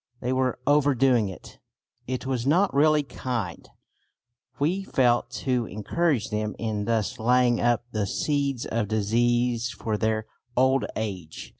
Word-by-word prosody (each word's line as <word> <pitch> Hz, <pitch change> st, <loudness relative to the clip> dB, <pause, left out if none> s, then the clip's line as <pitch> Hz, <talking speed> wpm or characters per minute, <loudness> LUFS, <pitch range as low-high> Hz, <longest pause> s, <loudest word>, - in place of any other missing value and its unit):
They 125 Hz, +1 st, -1 dB
were 130 Hz, -1 st, 0 dB
overdoing 135 Hz, -6 st, +3 dB
it. 95 Hz, -, -12 dB, 0.5 s
It 130 Hz, 0 st, -3 dB
was 130 Hz, -1 st, -2 dB
not 185 Hz, +7 st, +3 dB
really 150 Hz, +1 st, +4 dB
kind, 120 Hz, -, -5 dB, 0.9 s
we 175 Hz, +7 st, 0 dB
felt, 120 Hz, -8 st, +2 dB, 0.2 s
to 125 Hz, -4 st, +1 dB
encourage 115 Hz, -, -1 dB
them 105 Hz, 0 st, -2 dB
in 105 Hz, -2 st, -2 dB
thus 115 Hz, -2 st, -1 dB
laying 120 Hz, +1 st, +3 dB
up 120 Hz, 0 st, +2 dB
the 105 Hz, -2 st, -1 dB
seeds 140 Hz, 0 st, -1 dB
of 115 Hz, -2 st, -1 dB
disease 120 Hz, +3 st, +1 dB
for 110 Hz, -2 st, -3 dB
their 110 Hz, 0 st, 0 dB, 0.3 s
old 130 Hz, +1 st, +3 dB
age. 95 Hz, -8 st, -5 dB
120 Hz, 135 wpm, -26 LUFS, 110-135 Hz, 0.9 s, really